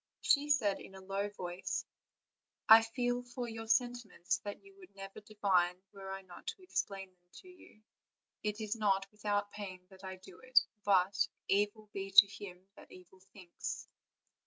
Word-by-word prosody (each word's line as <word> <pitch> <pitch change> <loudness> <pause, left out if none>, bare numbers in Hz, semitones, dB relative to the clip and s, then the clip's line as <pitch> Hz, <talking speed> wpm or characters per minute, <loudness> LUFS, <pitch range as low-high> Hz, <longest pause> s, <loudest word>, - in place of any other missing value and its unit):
She 290 +1 +3
said 215 -9 +3
in 195 - -12
a - - -9
low 195 +2 -2
voice: 185 -1 -4 0.8
"I 220 +1 +11
feel 245 +2 -1
for 245 0 -6
you 225 -1 -6
sentiments 240 -6 0
that 205 - -7
you 395 0 -17
would 365 - -16
never 195 +1 -8
divine, 195 -4 +1
were 195 -1 -8
I 195 0 -5
not 180 -2 -13
to 380 - -5
explain 195 - -3
them 175 -1 -41
to 370 - -18
you; 360 -12 -17 0.6
it 210 +1 -2
is 215 0 -2
not 195 -3 +2
without 205 -1 -1
pain 185 -3 -8
that 190 0 -15
I 190 0 -5
do 185 -1 -15
it; 255 0 +5 0.2
but 195 -1 +3 0.2
'evil 205 +2 +1
be 195 0 -4
to 195 +1 +10
him 190 -2 -10
that - - -15
evil 185 +1 -15
thinks.' 180 -4 -6
205 Hz, 170 wpm, -34 LUFS, 190-225 Hz, 0.8 s, I